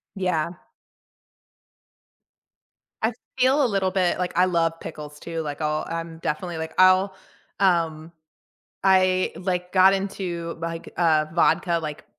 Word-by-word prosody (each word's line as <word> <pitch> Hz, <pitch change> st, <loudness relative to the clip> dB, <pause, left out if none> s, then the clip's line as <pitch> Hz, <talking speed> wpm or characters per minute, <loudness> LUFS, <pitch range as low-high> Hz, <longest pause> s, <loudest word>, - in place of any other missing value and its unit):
Yeah. 180 Hz, -4 st, -1 dB, 2.5 s
I 220 Hz, +2 st, +2 dB, 0.3 s
feel 265 Hz, +3 st, +4 dB
a -, -, +4 dB
little 195 Hz, -4 st, 0 dB
bit 185 Hz, -2 st, +1 dB
like, 180 Hz, -1 st, -2 dB
I 180 Hz, -, +5 dB
love 165 Hz, -2 st, 0 dB
pickles 150 Hz, -1 st, -8 dB
too, 165 Hz, +1 st, -5 dB
like, 145 Hz, -1 st, -6 dB
I'll 155 Hz, 0 st, -1 dB
I'm 165 Hz, 0 st, -5 dB
definitely 165 Hz, +2 st, -3 dB
like 160 Hz, 0 st, -5 dB
I'll 185 Hz, +1 st, +5 dB, 0.5 s
um, 165 Hz, -4 st, +1 dB, 0.7 s
I, 185 Hz, -1 st, +3 dB
like, 180 Hz, -1 st, -3 dB
got 190 Hz, 0 st, +6 dB
into, 185 Hz, -4 st, -3 dB
like, 165 Hz, 0 st, -5 dB
uh, 160 Hz, -3 st, +3 dB
vodka, 170 Hz, 0 st, +2 dB
like, 150 Hz, -1 st, -6 dB
175 Hz, 130 wpm, -24 LUFS, 165-185 Hz, 2.5 s, got